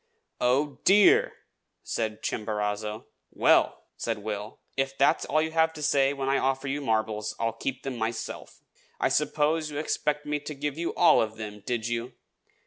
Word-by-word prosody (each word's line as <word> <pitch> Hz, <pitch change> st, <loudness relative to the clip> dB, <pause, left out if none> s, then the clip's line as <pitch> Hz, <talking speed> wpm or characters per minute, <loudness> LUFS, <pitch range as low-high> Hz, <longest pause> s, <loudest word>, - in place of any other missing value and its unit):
"Oh, 135 Hz, +2 st, +1 dB
DEAR!" 380 Hz, -, +6 dB, 0.5 s
said 110 Hz, -1 st, -3 dB
Chimborazo. 105 Hz, 0 st, -2 dB, 0.2 s
"Well," -, -, +3 dB
said 115 Hz, -1 st, -2 dB
Will, 105 Hz, 0 st, -5 dB, 0.2 s
"if 135 Hz, 0 st, -1 dB
that's 140 Hz, -, +3 dB
all 155 Hz, +2 st, +2 dB
you 160 Hz, -, -3 dB
have 160 Hz, 0 st, +2 dB
to 155 Hz, -1 st, -7 dB
say 140 Hz, -2 st, +3 dB
when 135 Hz, -1 st, -3 dB
I 135 Hz, +1 st, +2 dB
offer 135 Hz, +1 st, 0 dB
you 145 Hz, +2 st, -2 dB
marbles, 110 Hz, -3 st, -1 dB
I'll 115 Hz, -1 st, 0 dB
keep 130 Hz, +3 st, -4 dB
them 135 Hz, -3 st, -4 dB
myself. 115 Hz, 0 st, -5 dB, 0.4 s
I -, -, +2 dB
suppose 155 Hz, +1 st, +1 dB
you 145 Hz, -, -6 dB
expected 150 Hz, -1 st, -1 dB
me 150 Hz, 0 st, 0 dB
to 150 Hz, +1 st, -7 dB
give 145 Hz, 0 st, -3 dB
you 170 Hz, +1 st, -3 dB
all 170 Hz, -3 st, +6 dB
of 110 Hz, 0 st, -2 dB
them, 105 Hz, -1 st, -7 dB
did 120 Hz, 0 st, -2 dB
you? 120 Hz, +1 st, -3 dB
135 Hz, 170 wpm, -27 LUFS, 110-150 Hz, 0.5 s, DEAR